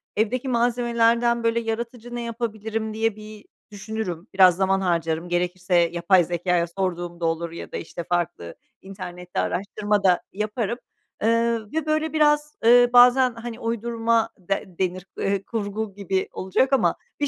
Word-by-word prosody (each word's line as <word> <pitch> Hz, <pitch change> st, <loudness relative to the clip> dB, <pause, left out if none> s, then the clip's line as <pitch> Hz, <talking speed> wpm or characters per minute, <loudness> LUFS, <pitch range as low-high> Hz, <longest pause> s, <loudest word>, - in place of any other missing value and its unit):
Evdeki 240 Hz, +5 st, 0 dB
malzemelerden, 235 Hz, 0 st, +2 dB
böyle, 230 Hz, 0 st, +2 dB
yaratıcı 235 Hz, +1 st, -5 dB
ne 240 Hz, -, -3 dB
yapabilirim 220 Hz, -2 st, -4 dB
diye 225 Hz, -1 st, 0 dB
bir 215 Hz, 0 st, -12 dB, 0.3 s
düşünürüm, 205 Hz, -3 st, -5 dB
biraz 185 Hz, -2 st, +6 dB
zaman 195 Hz, +1 st, +1 dB
harcarım, 170 Hz, -1 st, -1 dB
gerekirse 180 Hz, +1 st, -1 dB
yapay 175 Hz, +1 st, +4 dB
zekâya 175 Hz, 0 st, 0 dB
sorduğum 175 Hz, -1 st, -3 dB
da 170 Hz, -, -2 dB
olur. 165 Hz, 0 st, -1 dB
Ya 170 Hz, -, -8 dB
da, -, -, -4 dB
işte, 170 Hz, +1 st, -6 dB
farklı 175 Hz, -, -2 dB, 0.3 s
internette 180 Hz, -2 st, -7 dB
araştırma 205 Hz, +1 st, -1 dB
da 180 Hz, -2 st, +4 dB
yaparım. 215 Hz, +3 st, -2 dB, 0.5 s
Iıı, 230 Hz, -1 st, +1 dB
ve 320 Hz, -1 st, -1 dB
böyle 310 Hz, +1 st, 0 dB
biraz, 295 Hz, -1 st, +2 dB
ııı, 245 Hz, +1 st, +6 dB
bazen, 250 Hz, +1 st, +6 dB
hani, 230 Hz, 0 st, -7 dB
uydurma 230 Hz, 0 st, 0 dB
de 195 Hz, +3 st, -2 dB
denir, 185 Hz, 0 st, -1 dB
eee, 195 Hz, 0 st, -1 dB
kurgu 210 Hz, -1 st, -4 dB
gibi 190 Hz, -1 st, -1 dB
olacak 260 Hz, +9 st, 0 dB
ama 270 Hz, -, +3 dB, 0.2 s
bir 290 Hz, -, +1 dB
215 Hz, 145 wpm, -24 LUFS, 180-235 Hz, 0.5 s, biraz